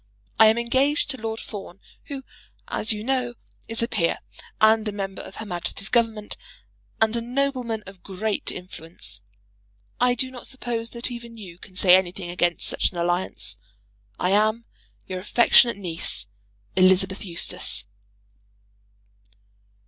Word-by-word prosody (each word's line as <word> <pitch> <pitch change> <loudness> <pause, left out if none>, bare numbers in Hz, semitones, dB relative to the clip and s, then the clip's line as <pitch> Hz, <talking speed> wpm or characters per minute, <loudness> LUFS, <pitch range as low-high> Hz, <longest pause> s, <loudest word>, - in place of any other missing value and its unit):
I 220 - +10
am 220 +1 +5
engaged 265 +6 +2
to 265 - -5
Lord 225 0 -3
Fawn, 195 -3 -8 0.3
who, 275 -2 -6 0.4
as 220 - +1
you 210 -1 -2
know, 250 -1 0 0.3
is 225 +1 +2
a - - +1
peer, 170 -8 +1 0.4
and 220 0 +5
a - - 0
member 195 -1 -4
of - - -11
Her 220 - -6
Majesty's 185 +1 -3
Government, 225 -3 +1 0.6
and 220 +1 +3
a 235 - 0
nobleman 245 -3 -1
of 190 -1 -12
great 200 +2 -2
influence. 165 - -9 0.8
I 245 0 +4
do 260 +2 -2
not 250 -2 -8
suppose 240 -3 -3
that 240 +1 -1
even 235 -1 -8
you 180 -5 -10
can 185 -2 -14
say 185 -1 +7
anything 180 -1 -1
against 175 -1 +1
such - - +2
an 180 - -9
alliance. 170 - 0 0.6
I 180 - +1
am, 215 +3 +3 0.4
your 185 -1 -4
affectionate 235 +3 +5
niece, 170 - -3 0.5
ELI. 185 0 +7 0.3
EUSTACE. 180 - +1
215 Hz, 140 wpm, -24 LUFS, 185-235 Hz, 0.8 s, I